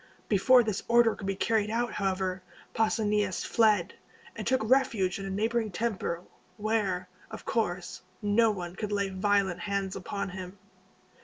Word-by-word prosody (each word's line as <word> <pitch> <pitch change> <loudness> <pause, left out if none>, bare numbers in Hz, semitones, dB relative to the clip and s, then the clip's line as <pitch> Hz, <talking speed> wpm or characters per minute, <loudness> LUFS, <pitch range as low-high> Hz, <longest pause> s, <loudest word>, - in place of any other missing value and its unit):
Before 240 +5 +6
this 215 -3 -2
order 235 -1 +5
could 195 - -7
be 195 - 0
carried 210 +1 +1
out, 235 0 -1
however, 190 -1 -1 0.3
Pausanias 210 -4 +1
fled, 210 -5 +3 0.4
and - - -5
took 260 -2 +2
refuge 225 -8 +2
in 195 - -5
a - - -4
neighboring 220 +3 0
temple, 185 -4 -3 0.3
where, 205 -4 0 0.2
of - - -9
course, 180 -6 -2 0.2
no 220 +2 +3
one 180 -4 -4
could 210 +1 -4
lay 200 -1 0
violent 190 -1 +1
hands 200 0 -2
upon 200 -1 -4
him. 185 +1 -8
205 Hz, 150 wpm, -29 LUFS, 190-225 Hz, 0.4 s, Before